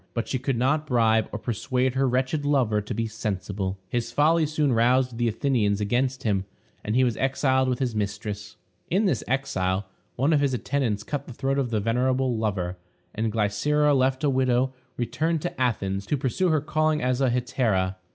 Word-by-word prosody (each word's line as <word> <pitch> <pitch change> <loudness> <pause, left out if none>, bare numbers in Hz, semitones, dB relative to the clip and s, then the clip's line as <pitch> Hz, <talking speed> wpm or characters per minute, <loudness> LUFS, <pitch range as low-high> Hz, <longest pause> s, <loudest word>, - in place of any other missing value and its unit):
But 115 - -2
she 130 - -1
could 130 -1 -1
not 150 +5 +1
bribe 110 -3 +2
or - - -3
persuade 125 +3 -1
her 135 0 +2
wretched 130 +4 0
lover 130 -8 +2
to 105 - -5
be 115 - -1
sensible; 100 -3 -3
his 120 +2 -2
folly 155 +4 +3
soon 150 -3 +1
roused 125 +1 +2
the 120 - +2
Athenians 110 -3 +1
against 125 +5 0
him, 100 -3 0 0.4
and 105 - -2
he 130 - +4
was 120 -3 +1
exiled 130 -1 +1
with 125 - 0
his 125 -3 -1
mistress. 105 0 -4 0.3
In 195 +5 +2
this 150 - +1
exile, 100 -8 -1 0.3
one 140 +6 +2
of 150 - +4
his 135 -3 +1
attendants 120 -5 -1
cut 140 +2 -4
the 130 - -8
throat 135 +3 -1
of 130 -3 0
the 110 -2 0
venerable 125 +3 +1
lover, 95 -5 -2 0.4
and 110 +1 -1
Glycera, 130 +8 +2
left 130 +1 +1
a 145 - +3
widow, 130 0 +1 0.2
returned 155 +6 -1
to 175 - -4
Athens 100 -5 -1
to 145 - +1
pursue 150 +8 0
her 155 -2 +2
calling 155 +1 +1
as 125 +1 +1
a 135 - +3
hetaira. 120 -7 0
125 Hz, 190 wpm, -25 LUFS, 110-135 Hz, 0.4 s, he